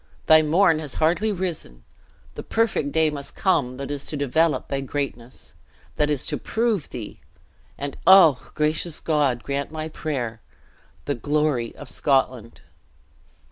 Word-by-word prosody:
Thy 155 -1 +7
morn 160 +1 +3
has 150 -5 -5
hardly 175 +7 +1
risen, 170 - -4 0.5
the - - -7
perfect 220 -10 0
day 160 0 +2
must 140 -1 -6
come 140 -10 +1
that 140 +1 -5
is 145 -1 -3
to 150 - -3
develop 145 +1 +1
thy 135 0 -2
greatness 135 -3 -5 0.4
that 150 0 +2
is 145 -3 0
to - - -2
prove 225 -7 -1
thee 115 -4 -8 0.6
(and 140 -1 -5
oh! 180 -8 +7
gracious 155 +2 0
God, 140 -7 0
grant 140 +1 -3
my 155 0 -5
prayer!) 125 -8 -4 0.6
the 145 - 0
glory 145 -2 -1
of - - -10
Scotland!" 130 -4 0
150 Hz, 140 wpm, -23 LUFS, 135-160 Hz, 0.6 s, Thy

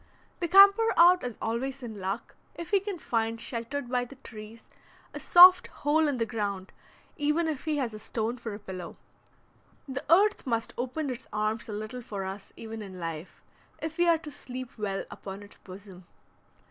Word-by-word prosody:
The 345 - -1
camper 395 +5 +7
out 355 +2 +7
is 245 -3 -4
always 255 +4 -3
in 220 -4 -7
luck 195 +4 -4 0.2
if 340 - -8
he 400 - +5
can 400 -1 -5
find, 230 -6 -1
sheltered 245 +4 -4
by 250 0 0
the 245 +3 -11
trees, 225 -3 -11 0.5
a - - -6
soft 360 +1 +8
hole 305 +2 +1
in 285 -3 -1
the 230 - 0
ground, 205 -4 -4 0.5
even 300 +3 +1
if 305 -3 -4
he 310 -2 0
has 250 -5 -2
a 215 - -8
stone 225 +2 -3
for 225 -3 -5
a - - -7
pillow. 185 -4 -8 0.9
The 265 0 -5
earth 405 -2 +4
must 230 -2 -1
open 260 +4 -3
its 250 0 -7
arms 215 +1 -2
a - - -4
little 215 +4 -5
for 200 -4 -5
us 195 +1 -7
even 225 -1 -7
in 190 -3 -9
life, 165 0 -7 0.4
if 320 +1 -6
we 350 - +4
are 335 -1 +5
to 310 -1 -10
sleep 255 -2 -8
well 200 -3 -3
upon 195 +1 -8
its 205 - -12
bosom. 185 -1 -12
240 Hz, 185 wpm, -28 LUFS, 210-300 Hz, 0.9 s, soft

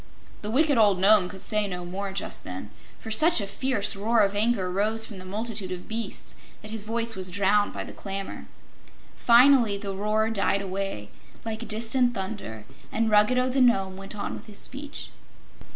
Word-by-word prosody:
'" - - -24
The 210 - -5
wicked 285 +2 +3
old 205 -3 +5
Nome 195 -1 +5
could 190 -1 -7
say 210 -1 0
no 180 -2 -5
more, 195 +3 -4
just 190 - -5
then, 95 +3 -7 0.3
for 220 - -8
such 310 +9 +5
a 200 - -1
fierce 205 0 0
roar 220 +3 +2
of 200 0 +2
anger 210 -2 +1
rose 215 +4 0
from 205 -4 -9
the 185 - -10
multitude 205 -1 -3
of 180 -1 -6
beasts 225 -2 -5 0.3
that 215 - -8
his 220 -1 -3
voice 230 +2 -1
was 185 -1 -1
drowned 200 +2 +2
by - - -5
the - - -10
clamor. 195 -1 -6 0.7
Finally 240 -3 +5
the 200 -1 -5
roar 215 +3 0
died 200 -1 +1
away, 190 - -4 0.3
like 225 +1 -4
distant 235 +3 +1
thunder, 190 - -6 0.3
and 225 0 0
Ruggedo 250 +5 +4
the 260 +1 +1
Nome 195 -6 +3
went 195 +2 -8
on 205 - -4
with - - -9
his 210 -2 -7
speech. 280 +2 -4
210 Hz, 185 wpm, -26 LUFS, 195-230 Hz, 0.7 s, old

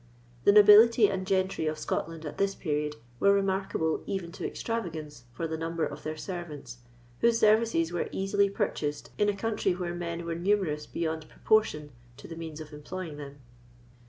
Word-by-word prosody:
The - - +8
nobility 210 +2 +8
and 190 -1 -3
gentry 190 -4 0
of 155 0 -1
Scotland, 165 +1 -3
at 150 - -7
this 195 0 +1
period, 150 -2 -2 0.2
were 200 - +5
remarkable 195 -4 0
even 185 -4 -3
to - - -4
extravagance 160 - -5
for 145 +8 -4
the 160 0 -4
number 165 0 -1
of - - -7
their 155 0 -5
servants, 155 -8 -7 0.4
whose 235 0 +4
services 215 -6 +3
were 175 - -2
easily 200 +1 +1
purchased 150 -6 -3
in 210 0 +3
a 205 - 0
country 215 -2 0
where 175 -1 -3
men 170 -1 -4
were 170 - -2
numerous 170 -4 0
beyond 160 -2 -3
proportion 155 -9 +1 0.3
to - - -11
the 165 - -8
means 160 -2 -7
of 155 -1 -9
employing 155 +1 -7
them. 140 -1 -9
170 Hz, 170 wpm, -29 LUFS, 155-200 Hz, 0.4 s, The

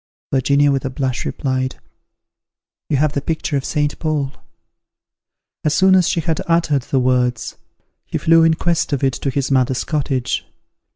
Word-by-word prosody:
Virginia 140 +2 +3
with 135 -1 0
a 135 - -2
blush 130 -1 -2
replied, 130 -1 -2 1.1
"You 145 - +2
have 150 +1 +1
the 140 - -1
picture 160 +1 -2
of 135 - 0
Saint 150 0 -1
Paul." 150 -4 -1 1.3
As 150 -1 +1
soon 190 0 +5
as 185 -2 +4
she 165 - 0
had 160 0 -1
uttered 165 -4 +2
the 135 +2 -1
words, 125 -2 0 0.5
he - - -2
flew 165 0 +4
in 165 0 +4
quest 170 -2 0
of 140 - -1
it 135 -1 +2
to 135 - -3
his 140 +1 -2
mother's 130 -1 +2
cottage. 135 -5 -1
140 Hz, 165 wpm, -19 LUFS, 130-155 Hz, 1.3 s, soon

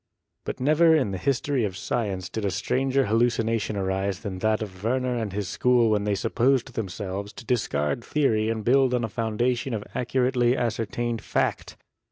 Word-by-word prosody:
But - - -4
never 155 +5 +5
in 130 -10 +1
the 95 - -4
history 135 +3 0
of 95 -3 -2
science 100 -6 -2
did 110 - -5
a 100 - +1
stranger 130 +8 0
hallu 115 +3 +3
cination 115 -2 -1
arise 95 0 -1
than 95 -4 -5
that 110 +1 +1
of 95 -2 -10
Werner 125 +2 0
and 110 -4 -2
his 100 0 -3
school 120 +2 +3
when 105 -1 +1
they 105 -1 +1
supposed 125 +4 +1
themselves 100 -1 -4
to 120 - -11
discard 105 - 0
theory 110 -8 +1
and 110 -1 -2
build 130 0 +4
on 120 - 0
a - - 0
foundation 115 +3 -1
of 105 - -4
accurately 125 0 +1
ascertained 115 0 -2
fact. - - -2
115 Hz, 180 wpm, -25 LUFS, 100-125 Hz, -, never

